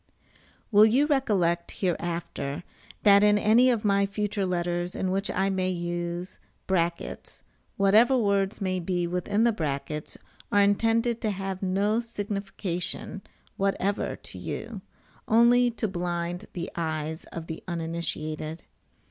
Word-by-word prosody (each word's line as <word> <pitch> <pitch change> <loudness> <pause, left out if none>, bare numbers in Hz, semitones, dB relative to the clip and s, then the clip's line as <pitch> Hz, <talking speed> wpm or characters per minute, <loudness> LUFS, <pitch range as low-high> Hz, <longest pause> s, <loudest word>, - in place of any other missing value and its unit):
Will 210 +1 +8
you 260 +6 +3
recollect, 195 - +1
hereafter, 170 -4 -2 0.4
that 200 -1 +7
in 210 0 +5
any 225 +5 +5
of 230 -4 0
my 200 -1 +3
future 200 -1 -2
letters, 175 0 -1
in 185 - -1
which 195 +2 -1
I 195 +1 +1
may 185 -1 0
use 175 0 -4
[] 170 -2 -4
whatever 215 +7 +5
words 200 -3 +1
may 185 -1 0
be 175 0 -1
within 180 +5 0
the 235 - +5
brackets 150 -4 -4 0.3
are 205 - +4
intended 225 +3 +2
to 220 - 0
have 195 -1 -4
no 200 +4 +1
signification 200 -4 -4 0.4
whatever 195 +1 0
to - - -10
you, - - -5 0.5
only 240 +2 +5
to 230 -1 -2
blind 175 0 -3
the 170 -2 -5
eyes 160 -1 -3
of 165 -1 -7
the 160 -1 -7
uninitiated. 160 -2 -4
190 Hz, 130 wpm, -27 LUFS, 175-210 Hz, 0.5 s, Will